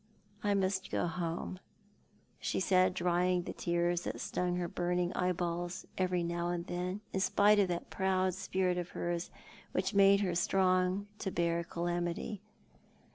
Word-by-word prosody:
" 205 Hz, +1 st, -29 dB
I -, -, +3 dB
must 190 Hz, 0 st, 0 dB
go -, -, 0 dB
home/' 170 Hz, +2 st, -3 dB, 0.8 s
she -, -, -1 dB
said, 185 Hz, -1 st, +3 dB
drying 180 Hz, 0 st, +2 dB
the -, -, -5 dB
tears 175 Hz, 0 st, 0 dB
that -, -, -4 dB
stung 180 Hz, 0 st, -1 dB
her 175 Hz, -1 st, -1 dB
burning 175 Hz, 0 st, -1 dB
eyeballs 175 Hz, -1 st, -1 dB
every 180 Hz, -2 st, +1 dB
now 170 Hz, 0 st, -1 dB
and 175 Hz, -1 st, -2 dB
then, 180 Hz, +3 st, -3 dB
in 190 Hz, -, 0 dB
spite 205 Hz, +2 st, +4 dB
of 200 Hz, -, +4 dB
that 175 Hz, -1 st, -4 dB
proud 190 Hz, -1 st, +1 dB
spirit 185 Hz, -1 st, 0 dB
of 175 Hz, 0 st, -4 dB
hers, 175 Hz, 0 st, -2 dB, 0.4 s
which 190 Hz, +2 st, 0 dB
made 200 Hz, 0 st, +6 dB
her 185 Hz, -3 st, 0 dB
strong 185 Hz, +2 st, +2 dB
to 195 Hz, -, -2 dB
bear 170 Hz, -1 st, 0 dB
calamity. 175 Hz, +4 st, -2 dB
180 Hz, 155 wpm, -33 LUFS, 175-190 Hz, 0.8 s, made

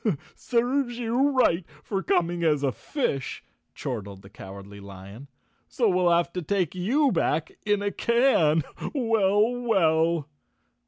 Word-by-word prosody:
" -, -, -25 dB
Serves 245 Hz, +1 st, -1 dB
you 245 Hz, +4 st, +1 dB
right 250 Hz, -10 st, +2 dB, 0.2 s
for 195 Hz, -2 st, -2 dB
coming 175 Hz, -2 st, 0 dB
as 150 Hz, -3 st, +2 dB
a 135 Hz, -, +2 dB
fish," 140 Hz, -, -3 dB, 0.3 s
chortled 100 Hz, -5 st, -6 dB
the 95 Hz, -, -15 dB
Cowardly 100 Hz, 0 st, -11 dB
Lion. 100 Hz, +6 st, -11 dB, 0.4 s
So 235 Hz, -, 0 dB
we'll 180 Hz, -2 st, +3 dB
have 170 Hz, 0 st, +2 dB
to 180 Hz, -, -3 dB
take 180 Hz, 0 st, -1 dB
you 250 Hz, +11 st, +1 dB
back 160 Hz, -3 st, 0 dB, 0.2 s
in 205 Hz, -1 st, +1 dB
a 205 Hz, -, -1 dB
can. 235 Hz, -, +2 dB, 0.3 s
Well, 220 Hz, -3 st, +2 dB
well!" 165 Hz, -, +2 dB
180 Hz, 140 wpm, -26 LUFS, 145-235 Hz, 0.4 s, we'll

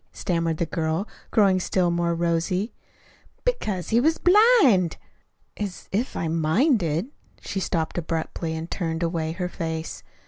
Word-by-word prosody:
stammered 165 Hz, -2 st, -1 dB
the 170 Hz, -, 0 dB
girl, 160 Hz, +4 st, -2 dB, 0.2 s
growing 195 Hz, -4 st, +4 dB
still 180 Hz, -1 st, +1 dB
more 170 Hz, 0 st, 0 dB
rosy. 170 Hz, +5 st, 0 dB, 0.7 s
"Because 215 Hz, -, -1 dB
he 230 Hz, -, +4 dB
was 320 Hz, +6 st, +2 dB
blind." 360 Hz, -, +5 dB, 0.6 s
"As 200 Hz, -3 st, -5 dB
if 225 Hz, +7 st, -1 dB
I'd 165 Hz, -, -1 dB
minded 170 Hz, -, +1 dB, 0.2 s
" -, -, -32 dB
She 195 Hz, -, -2 dB
stopped 170 Hz, -3 st, -1 dB
abruptly 165 Hz, 0 st, -3 dB
and 160 Hz, 0 st, -4 dB
turned 165 Hz, -2 st, -2 dB
away 165 Hz, -1 st, -1 dB
her 180 Hz, +1 st, -3 dB
face. 160 Hz, -3 st, -4 dB
175 Hz, 140 wpm, -24 LUFS, 165-205 Hz, 0.7 s, blind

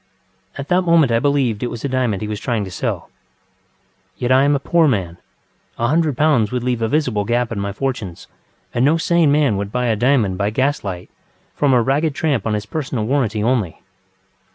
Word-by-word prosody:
At 140 Hz, 0 st, -6 dB
that 180 Hz, +1 st, +3 dB
moment 165 Hz, -7 st, +3 dB
I 115 Hz, -, +3 dB
believed 135 Hz, -6 st, 0 dB
it 125 Hz, -, -2 dB
was 120 Hz, +3 st, -6 dB
a -, -, +1 dB
diamond 125 Hz, -7 st, -1 dB
he -, -, -3 dB
was 105 Hz, -1 st, -4 dB
trying 115 Hz, -4 st, -2 dB
to 95 Hz, -, -9 dB
sell. -, -, -4 dB, 1.1 s
Yet 125 Hz, +1 st, -1 dB
I 130 Hz, +2 st, +5 dB
am 145 Hz, 0 st, +3 dB
a -, -, 0 dB
poor 165 Hz, +3 st, +2 dB
man, 95 Hz, -, -1 dB, 0.6 s
a 115 Hz, 0 st, 0 dB
hundred 155 Hz, -3 st, +1 dB
pounds 140 Hz, -8 st, +2 dB
would 125 Hz, -1 st, -2 dB
leave 125 Hz, -2 st, -1 dB
a 115 Hz, -, +1 dB
visible 125 Hz, -6 st, 0 dB
gap 120 Hz, +2 st, 0 dB
in 110 Hz, -, -3 dB
my 100 Hz, 0 st, -2 dB
fortunes 110 Hz, -6 st, -4 dB, 0.5 s
and 120 Hz, -, +1 dB
no 150 Hz, +4 st, +4 dB
sane 165 Hz, -2 st, +2 dB
man 145 Hz, -8 st, +2 dB
would 100 Hz, 0 st, -4 dB
buy 125 Hz, +1 st, -1 dB
a 115 Hz, -2 st, +1 dB
diamond 110 Hz, -5 st, +1 dB
by 100 Hz, 0 st, +1 dB
gaslight 105 Hz, -7 st, -2 dB, 0.4 s
from 145 Hz, -2 st, +1 dB
a 125 Hz, -2 st, +4 dB
ragged 145 Hz, +4 st, 0 dB
tramp 140 Hz, -10 st, 0 dB
on 105 Hz, -, 0 dB
his 105 Hz, 0 st, -4 dB
personal 130 Hz, -4 st, -3 dB
warranty 115 Hz, -5 st, 0 dB
only. 110 Hz, -8 st, 0 dB
125 Hz, 205 wpm, -19 LUFS, 105-145 Hz, 1.1 s, I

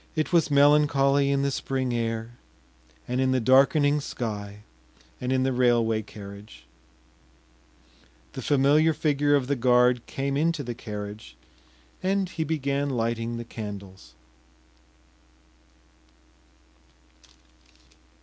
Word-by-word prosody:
It 155 Hz, +2 st, -2 dB
was 170 Hz, -2 st, +3 dB
melancholy 140 Hz, -1 st, +4 dB
in 140 Hz, 0 st, +1 dB
the 140 Hz, -, 0 dB
spring 130 Hz, -2 st, -2 dB
air, 115 Hz, -1 st, -3 dB, 0.8 s
and 125 Hz, +1 st, -1 dB
in 130 Hz, 0 st, +2 dB
the 130 Hz, -, +2 dB
darkening 140 Hz, +4 st, +4 dB
sky, 105 Hz, -5 st, -6 dB, 0.6 s
and 125 Hz, 0 st, -2 dB
in 130 Hz, 0 st, +1 dB
the 130 Hz, 0 st, 0 dB
railway 120 Hz, -3 st, +2 dB
carriage. 100 Hz, -, -12 dB, 1.7 s
The -, -, -6 dB
familiar 150 Hz, +3 st, +3 dB
figure 145 Hz, -1 st, +1 dB
of 140 Hz, -3 st, +1 dB
the 140 Hz, +2 st, -1 dB
guard 125 Hz, -1 st, +3 dB
came 135 Hz, 0 st, -3 dB
into 165 Hz, 0 st, 0 dB
the 120 Hz, -1 st, -5 dB
carriage, 105 Hz, -, -8 dB, 0.7 s
and 195 Hz, 0 st, 0 dB
he 160 Hz, -, -3 dB
began 140 Hz, -2 st, -1 dB
lighting 115 Hz, -1 st, -2 dB
the 120 Hz, -, -6 dB
candles. 100 Hz, -, -9 dB
130 Hz, 110 wpm, -25 LUFS, 115-145 Hz, 1.7 s, melancholy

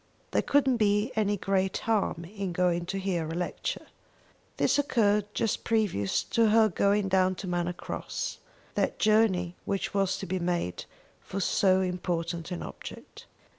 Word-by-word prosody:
There -, -, +2 dB
couldn't 270 Hz, -3 st, +3 dB
be 210 Hz, +2 st, +2 dB
any 205 Hz, -1 st, +1 dB
great 190 Hz, 0 st, 0 dB
harm 205 Hz, -6 st, 0 dB
in 195 Hz, 0 st, -5 dB
going 175 Hz, -1 st, +1 dB
to 195 Hz, -, -2 dB
hear 185 Hz, -4 st, -1 dB
a 165 Hz, -, -4 dB
lecture." 180 Hz, +1 st, -3 dB, 0.7 s
This -, -, +3 dB
occurred 210 Hz, -7 st, +2 dB
just 225 Hz, -3 st, 0 dB
previous 205 Hz, -, +1 dB
to 230 Hz, -1 st, +2 dB
her 220 Hz, 0 st, +5 dB
going 200 Hz, +2 st, +2 dB
down 185 Hz, -1 st, +3 dB
to 185 Hz, -, -7 dB
Manor 175 Hz, 0 st, 0 dB
Cross, -, -, -5 dB, 0.3 s
that -, -, 0 dB
journey 210 Hz, -5 st, +3 dB
which 195 Hz, -1 st, -2 dB
was 195 Hz, -1 st, +1 dB
to -, -, -5 dB
be 185 Hz, +2 st, -2 dB
made 175 Hz, -, -2 dB, 0.4 s
for 195 Hz, -, -5 dB
so 190 Hz, 0 st, +3 dB
important 175 Hz, -2 st, -2 dB
an 180 Hz, -, -4 dB
object. -, -, -10 dB
190 Hz, 155 wpm, -28 LUFS, 175-210 Hz, 0.7 s, her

